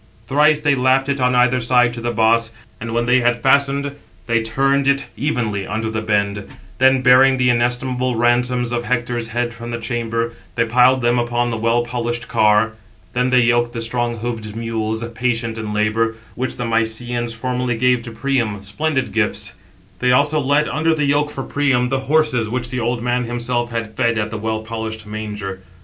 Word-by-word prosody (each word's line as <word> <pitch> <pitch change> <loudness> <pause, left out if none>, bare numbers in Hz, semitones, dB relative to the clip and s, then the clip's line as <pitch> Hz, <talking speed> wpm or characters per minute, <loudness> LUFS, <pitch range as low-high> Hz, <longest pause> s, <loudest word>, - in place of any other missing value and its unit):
Thrice 150 +4 +3
they 145 -1 +3
lapped 130 +1 +2
it 140 -1 -1
on 125 0 +2
either 125 +1 +3
side 125 0 +3
to 120 - -6
the 120 - -2
boss; 115 0 +2 0.3
and 115 +1 -5
when 120 +1 0
they 125 +1 +4
had 120 -1 0
fastened, 140 +1 +2 0.3
they 115 0 +1
turned 135 +5 +1
it 140 0 +2
evenly 115 -8 -2
under 110 +1 -2
the 110 0 -2
bend; 100 -2 -1 0.3
then, 130 0 +4
bearing 130 +1 +6
the 125 -1 +3
inestimable 125 +1 0
ransoms 120 +1 +1
of 120 0 -1
Hector's 120 -1 -1
head 120 +1 -2
from 115 +1 -8
the 115 - -3
chamber, 115 -1 -2 0.2
they 115 - +2
piled 125 +3 +4
them 120 +1 +2
upon 120 0 0
the 115 - -2
well 115 +2 +1
polished 120 0 -3
car. 105 +1 +3 0.4
Then 125 +1 +1
they 125 0 +4
yoked 120 0 +2
the 115 - -4
strong 120 0 -1
hoofed 110 -2 -5
mules, 110 -1 -2
patient 115 -2 -1
in 110 -1 -4
labour, 110 +2 0 0.2
which 130 +1 -3
the 125 - -3
Mysians 115 +1 -1
formerly 125 0 -2
gave 125 0 +2
to 115 - -8
Priam, 115 -4 -1
splendid 130 +3 -1
gifts. 110 -1 -1 0.5
They 125 0 +2
also 145 +4 +3
led 145 +2 +2
under 160 +1 +1
the 150 -2 0
yoke 145 +1 +1
for 135 -2 -5
Priam, 135 -4 +1
the 135 0 0
horses, 150 -8 +2
which 120 0 -2
the 125 - -2
old 120 0 -1
man 125 0 0
himself 120 0 -2
had 115 -2 -4
fed 115 -2 +1
at 110 0 -2
the 110 - -4
well 110 0 -2
polished 110 -1 -5
manger. 105 -3 -6
120 Hz, 190 wpm, -19 LUFS, 115-125 Hz, 0.5 s, bearing